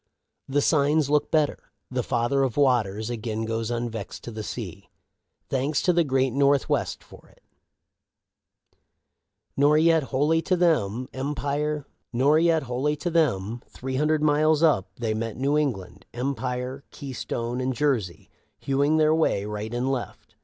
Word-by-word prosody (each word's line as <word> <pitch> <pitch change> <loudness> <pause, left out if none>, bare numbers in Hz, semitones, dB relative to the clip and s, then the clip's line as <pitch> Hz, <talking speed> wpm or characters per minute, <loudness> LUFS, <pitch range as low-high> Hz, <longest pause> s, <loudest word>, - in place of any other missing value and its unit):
" - - -55
The 145 +1 +1
signs 145 -1 +2
look 150 -1 +2
better. 155 -2 0 0.2
The 125 -1 0
Father 120 +4 0
of 130 -4 -1
Waters 115 -5 +2
again 110 -1 -3
goes 115 0 -2
unvexed 115 -3 -4
to 120 - -7
the 110 -1 -6
sea. 105 - -7 0.6
Thanks 140 +3 0
to 180 - +3
the 170 0 +3
great 135 -2 +1
North 140 0 +3
west - - -1
for - - -16
it. - - -26 2.1
Nor 145 +2 +4
yet 160 -2 +4
wholly 150 +5 +1
to 185 +3 +1
them. 130 - +1 0.3
Three 145 - 0
hundred 150 +1 +1
miles 155 +1 +3
up 130 - +3
they 115 -1 -2
met 110 0 -4
New 140 +3 +1
England, 130 -12 -2
Empire, 125 +1 -3
Keystone, 125 -3 -4
and 130 +1 0
Jersey, 120 -10 -1 0.3
hewing 140 +3 +1
their 155 0 +4
way 155 -11 +1
right 105 +1 -5
and 125 +2 -1
left. 130 -3 -6
135 Hz, 135 wpm, -25 LUFS, 120-150 Hz, 2.1 s, Nor